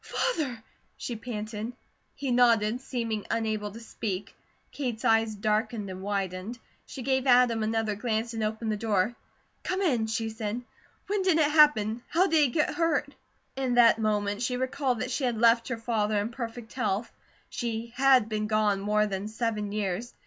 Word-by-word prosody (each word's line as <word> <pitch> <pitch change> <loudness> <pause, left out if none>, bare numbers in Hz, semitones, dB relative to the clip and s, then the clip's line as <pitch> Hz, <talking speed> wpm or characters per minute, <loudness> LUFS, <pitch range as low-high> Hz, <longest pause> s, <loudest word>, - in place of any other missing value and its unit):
"Father 275 - -2 0.2
?" - - -41
she 240 - -4
panted. 220 0 -5 0.4
He 275 -3 -3
nodded, 235 -1 +3
seeming 230 -5 -3
unable 215 -2 -1
to 215 +3 -10
speak. 205 -4 -5 0.4
Kate's 250 -4 -4
eyes 225 -1 +3
darkened 215 0 -1
and 185 0 -7
widened. 195 +2 -3 0.3
She 260 - -7
gave 265 +1 +1
Adam 245 -2 +5
another 220 0 0
glance 225 +2 -2
and 225 -1 -2
opened 220 +1 -2
the 210 - -1
door. 215 +1 0 0.5
"Come 370 - -2
in," 255 - +1
she 225 0 -2
said. 220 +2 -4 0.4
"When 405 0 0
did 370 -4 +3
it 300 -2 +3
happen? 240 -8 +4
How 360 +2 +3
did 330 -4 +2
he 295 - +5
get 300 +5 0
hurt?" 325 -4 0 0.4
In 260 -2 -1
that 230 -2 +6
moment 210 -1 0
she 250 0 0
recalled 260 -1 -1
that 255 - -3
she 270 - -2
had 245 -3 0
left 230 +1 +4
her 235 - -3
father 220 -2 0
in 205 +2 -2
perfect 235 -1 -7
health, 220 -2 -1 0.4
she 230 -1 -4
had 260 -3 +5
been 215 -1 -2
gone 215 -2 +2
more 210 +1 +2
than 195 0 -3
seven 215 -2 -2
years. 210 +2 -3
225 Hz, 175 wpm, -28 LUFS, 215-250 Hz, 0.5 s, that